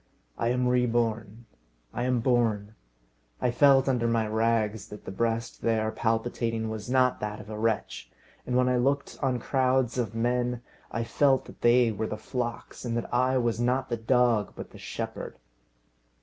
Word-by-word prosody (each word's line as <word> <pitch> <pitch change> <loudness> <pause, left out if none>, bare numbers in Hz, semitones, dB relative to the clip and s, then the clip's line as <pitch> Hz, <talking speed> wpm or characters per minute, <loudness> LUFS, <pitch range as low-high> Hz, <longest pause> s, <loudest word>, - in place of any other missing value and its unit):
I 115 - -1
am 125 +1 +1
reborn. 115 -2 0 0.5
I 120 - -2
am 125 -2 +1
born. 115 -4 +1 0.7
I 125 - +1
felt 135 +1 +5
under 125 -3 +1
my 115 -1 +1
rags 110 -2 0
that 105 - -11
the - - -5
breast 115 +3 -2
there 110 -1 +1
palpitating 115 0 -1
was 110 0 -6
not 130 -1 +3
that 105 0 -4
of 105 0 -10
a 105 - -5
wretch; 110 -1 -1 0.4
and 125 - -1
when 125 0 +3
I 125 0 +2
looked 140 +3 0
on 130 -3 +1
crowds 130 0 +1
of 115 -2 -2
men, 120 +1 0 0.3
I 115 - -2
felt 135 +2 +2
that - - -14
they 120 0 +5
were 110 +1 -3
the 110 - -4
flocks, 120 0 -5
and 120 -1 -2
that 120 - -4
I 130 +1 +3
was 120 -2 0
not 125 +2 0
the 120 - 0
dog, 115 -2 +2
but - - -8
the - - -13
shepherd! - - -6
120 Hz, 175 wpm, -27 LUFS, 110-125 Hz, 0.7 s, felt